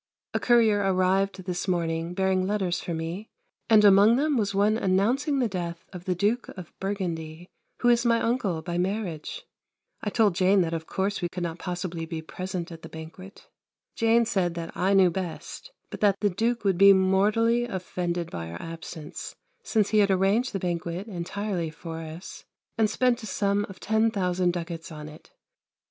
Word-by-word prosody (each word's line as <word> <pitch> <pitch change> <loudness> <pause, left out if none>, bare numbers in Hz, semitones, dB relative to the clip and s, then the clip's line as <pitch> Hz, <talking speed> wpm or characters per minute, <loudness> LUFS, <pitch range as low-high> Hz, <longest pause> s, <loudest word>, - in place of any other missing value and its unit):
A - - +1
courier 230 -4 +4
arrived 190 0 +1
this 180 +1 -3
morning, 170 -1 -1
bearing 190 -1 +1
letters 190 -4 0
for - - -5
me, 165 +6 -4 0.4
and 215 -2 +7
among 205 +3 +7
them 295 +3 +1
was 200 -4 0
one 205 +2 +3
announcing 230 +9 +1
the 250 -3 +2
death 170 -3 -5
of 180 -1 -8
the 185 - 0
Duke 210 +7 0
of 180 -3 -9
Burgundy, 175 -4 -4 0.3
who 245 - +4
is 235 -1 +4
my 230 -1 +3
uncle 210 -10 -1
by 175 +1 -2
marriage. 190 - -3 0.6
I 210 - -2
told 210 -3 +3
Jane 190 +2 +4
that 165 -1 -1
of 160 -1 -4
course 195 +1 -1
we 175 - -1
could 180 +1 -5
not 170 0 -4
possibly 175 -2 -4
be 160 -1 -5
present 185 +1 -5
at 165 -1 -9
the - - -10
banquet. 165 +5 -11 0.5
Jane 230 +1 +3
said 185 -6 0
that 170 -1 -6
I 195 +2 +2
knew 185 -2 +5
best, 185 - -6 0.2
but - - -6
that 200 -2 +3
the 205 -1 +1
Duke 230 +5 0
would 190 -3 +1
be 200 0 +9
mortally 210 +5 +3
offended 180 -4 -3
by 85 -1 -5
our 85 - -7
absence, 165 -2 -8 0.3
since 215 -3 +1
he 215 - +3
had 200 -1 +4
arranged 195 +6 +2
the 195 - -2
banquet 175 0 -3
entirely 185 -2 -3
for 160 +1 -7
us 165 +3 -9 0.3
and 220 -2 +2
spent 250 +1 +1
a 220 - -7
sum 200 0 0
of 190 - -11
10,000 195 -5 +1
ducats 170 -1 -6
on 150 -1 -8
it. 155 - -15
190 Hz, 180 wpm, -26 LUFS, 170-210 Hz, 0.6 s, be